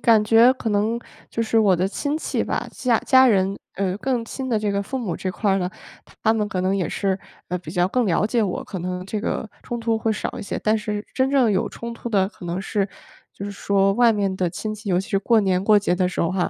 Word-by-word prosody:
感 225 -2 +5
觉 230 +3 +6
可 245 -3 -4
能 215 +3 +1 0.3
就 230 - -1
是 225 0 +2
我 200 -4 +4
的 185 +2 +1
亲 285 +9 -2
戚 - - -1
吧， - - -2
家 240 -3 +1
家 260 -1 +6
人， 195 -4 +2 0.2
呃， 190 -1 -1
更 250 -2 -1
亲 260 +2 -5
的 225 - +2
这 210 -1 -1
个 200 0 0
父 265 +6 -4
母 210 -8 -3
这 185 - -3
块 200 +3 0
儿 195 - +2
呢， 180 -1 -2 0.5
他 220 - +4
们 215 -2 0
可 185 -4 -2
能 190 +2 +1
也 185 - -1
是， 195 -1 -1 0.3
呃， 180 - -1
比 165 -3 -9
较 180 +1 +2
更 245 +4 +1
了 190 +1 +2
解 230 +1 +1
我， 190 - -2
可 190 -4 -6
能 180 +1 -4
这 210 +1 -3
个 220 0 -2
冲 240 - -4
突 230 -1 0
会 220 0 0
少 - - -4
一 - - -5
些。 - - -4
但 215 +1 +2
是 210 -1 -3
真 265 +1 +2
正 260 -5 +4
有 195 - +1
冲 235 0 -7
突 235 - -6
的 195 -4 +2
可 195 - -13
能 175 +2 -2
是 200 0 -1 0.5
就 200 - -7
是 205 - -4
说 195 0 +2
外 235 +1 +5
面 200 -2 0
的 180 -2 0
亲 215 +5 -4
戚。 210 0 -8
尤 180 0 +3
其 195 - -9
是 195 - +1
过、 225 +2 +3
年 190 -2 +1
过 210 +1 +5
节 200 -3 +1
的 180 0 +1
时 180 - -3
候 170 - +1
哈， 185 -1 0
205 Hz, 285 characters per minute, -23 LUFS, 190-230 Hz, 0.5 s, 觉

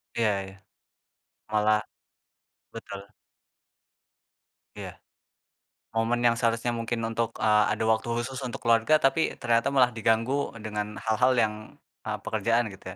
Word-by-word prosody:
Ya 105 -4 +1
ya. 95 0 -12 1.0
Malah 105 0 +3 0.9
betul. 100 +1 -9 1.7
Iya. - - -7 1.0
Momen 115 +2 0
yang 120 -1 +4
seharusnya 115 +1 0
mungkin 115 0 -3
untuk, 115 0 -2
eee, 105 -1 +4
ada - - -2
waktu 110 +1 +1
khusus 125 +2 -3
untuk 120 - -6
keluarga, 115 +6 +4
tapi 145 +4 +2
ternyata 115 0 +2
malah 125 -2 +5
diganggu 115 +5 0
dengan 105 -1 -4
hal 110 -1 +1
hal 130 +1 +5
yang, 110 -3 +2 0.5
eee, - - -2
pekerjaan 115 +2 0
gitu 95 -1 -10
115 Hz, 125 wpm, -27 LUFS, 110-120 Hz, 1.7 s, malah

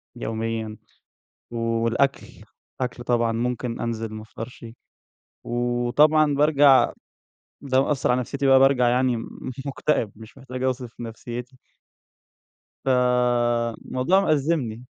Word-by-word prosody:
يوميًا 110 -1 -4 0.7
والأكل، 115 +3 0 0.5
أكل 125 -1 -3
طبعًا، 120 -1 +1
ممكن 120 +1 -2
أنزل 115 -2 -3
ما 110 - -7
أفطرش 115 +2 -9 0.8
وطبعًا 120 +6 +2
بارجع 145 -2 +5 0.7
ده 130 -1 +2
مأثّرعلى 130 -3 +1
نفسيتي 140 +3 -2
بقى 135 0 +7
بارجع 130 -2 +4
يعني 125 0 +2 0.5
مُكتئب، 140 -5 0
مش 110 +4 -14
محتاج 130 -1 -7
أوصف 125 -2 -3
نفسيّتي. 120 +2 -7 1.3
فالموضوع 125 +4 +1
مأزّمني. 145 - 0
125 Hz, 90 wpm, -24 LUFS, 115-135 Hz, 1.3 s, بقى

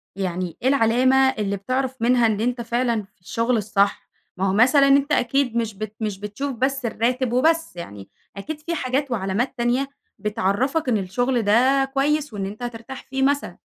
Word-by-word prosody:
يعني 180 -3 -3
إيه 255 - 0
العلامة 255 0 +3
اللي 210 -6 -2
بتعرف 255 +5 -2
منها 240 0 +4
إن 215 -2 +1
أنت 245 +1 -1
فعلًا 235 -1 0
في 195 -2 -26
الشغل 230 +6 0
الصح؟ 200 -1 0 0.3
ما 190 - 0
هو - - 0
مثلًا 260 +6 +5
أنت 280 +1 +3
أكيد 250 -2 +1
مش 225 -2 -1
بت 215 +1 -6
مش 210 -3 -3
بتشوف 210 +8 -4
بس 265 +2 -1
الراتب 240 +2 0
وبس 325 - +2
يعني، 105 - -9 0.3
أكيد 295 +10 -5
في 335 +2 -3
حاجات 265 -1 -1
وعلامات 215 +4 -1
تانية 245 +3 0 0.3
بتعَرّفك 235 - 0
إن 230 - +3
الشغل 240 +6 0
ده 255 +6 +3
كويس 290 0 0
وإن 200 -2 -3
أنت 210 +5 -7
هترتاح 240 +2 -7
فيه 265 0 -2
مثلًا؟ 285 +1 0
240 Hz, 175 wpm, -22 LUFS, 210-265 Hz, 0.3 s, مثلًا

